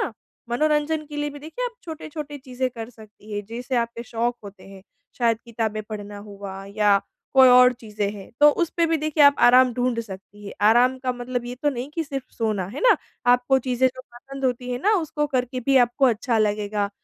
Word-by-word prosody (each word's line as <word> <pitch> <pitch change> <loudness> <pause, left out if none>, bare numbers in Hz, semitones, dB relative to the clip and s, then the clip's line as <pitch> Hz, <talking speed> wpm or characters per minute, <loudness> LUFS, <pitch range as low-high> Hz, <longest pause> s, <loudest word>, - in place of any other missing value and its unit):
ना? - - -5 0.4
मनोरंजन 305 +4 +1
के 295 0 -9
लिए 295 0 -2
भी, 290 - -10
देखिए, 320 - -6
आप 480 -1 -4
छोटे-छोटे 305 -2 -7
चीज़ें 260 -1 -3
कर 230 -1 -8
सकती 215 -2 -15
हैं, 205 0 -3
जैसे 245 +4 -4
आपके 235 0 -2
शौक 235 +1 -2
होते 200 0 -12
हैं। 195 -1 -13 0.4
शायद 230 -2 +2
किताबें 220 -2 -3
पढ़ना 205 -1 -7
हुआ 200 -1 -9
या 205 -2 +4 0.4
कोई 265 -1 +8
और 250 0 +7
चीज़ें 215 -4 -4
हैं, 200 -2 -11
तो 295 0 +8
उस 340 +2 -1
पे 335 -1 +3
भी 325 - +1
देखिए, 310 0 +1
आप 285 0 +6
आराम 250 +1 +6
ढूँढ 245 -1 0
सकती 205 -1 -11
हैं। 200 - -7 0.2
आराम 250 +3 +4
का 255 -1 -2
मतलब 245 0 -4
ये 245 - -5
तो 295 - +3
नहीं 255 +1 -5
कि 330 - -2
सिर्फ़ 275 -3 -5
सोना, 215 -5 -1
है 230 - -7
ना? - - +5 0.4
आपको 250 +2 +3
चीज़ें 260 0 +1
जो 255 0 -11
पसंद 270 +2 -9
होती 250 -1 -1
हैं 245 - -2
ना, 420 - +3
उसको 310 -5 -1
करके 255 -2 -2
भी 275 -1 +4
आपको 245 +3 0
अच्छा 235 0 +1
लगेगा, 210 -1 0
245 Hz, 210 wpm, -23 LUFS, 215-280 Hz, 0.4 s, कोई